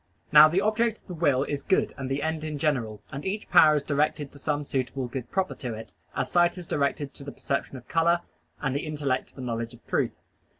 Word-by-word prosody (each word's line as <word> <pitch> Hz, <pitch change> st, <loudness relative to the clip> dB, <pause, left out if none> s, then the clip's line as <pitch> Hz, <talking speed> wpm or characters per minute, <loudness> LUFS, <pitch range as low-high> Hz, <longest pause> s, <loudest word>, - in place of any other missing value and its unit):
Now 150 Hz, 0 st, +10 dB
the 175 Hz, +5 st, +1 dB
object 220 Hz, +2 st, +1 dB
of -, -, -30 dB
the 180 Hz, -, -6 dB
will 145 Hz, -6 st, +2 dB
is 145 Hz, -1 st, -3 dB
good 190 Hz, -, +1 dB
and 135 Hz, -1 st, -5 dB
the 135 Hz, +1 st, -1 dB
end 160 Hz, 0 st, -1 dB
in 155 Hz, -1 st, -3 dB
general, 120 Hz, -8 st, -1 dB
and 140 Hz, +1 st, -5 dB
each 205 Hz, +2 st, -3 dB
power 155 Hz, -4 st, +7 dB
is 145 Hz, -, 0 dB
directed 145 Hz, 0 st, 0 dB
to 140 Hz, -, -13 dB
some 145 Hz, +1 st, -1 dB
suitable 130 Hz, -1 st, -2 dB
good 125 Hz, 0 st, -6 dB
proper 190 Hz, -1 st, 0 dB
to 120 Hz, -5 st, -5 dB
it, 110 Hz, +1 st, -10 dB, 0.2 s
as 130 Hz, -, -2 dB
sight 175 Hz, +1 st, +3 dB
is 180 Hz, -, -7 dB
directed 140 Hz, -1 st, -1 dB
to 140 Hz, -, -9 dB
the 140 Hz, -, -6 dB
perception 140 Hz, -1 st, -3 dB
of 125 Hz, -, -13 dB
color, 170 Hz, +1 st, +3 dB, 0.4 s
and 135 Hz, -2 st, -1 dB
the 150 Hz, +3 st, -2 dB
intellect 145 Hz, -4 st, -1 dB
to -, -, -15 dB
the 130 Hz, -, -8 dB
knowledge 115 Hz, -2 st, -3 dB
of -, -, -22 dB
truth. -, -, 0 dB
145 Hz, 240 wpm, -27 LUFS, 135-165 Hz, 0.4 s, Now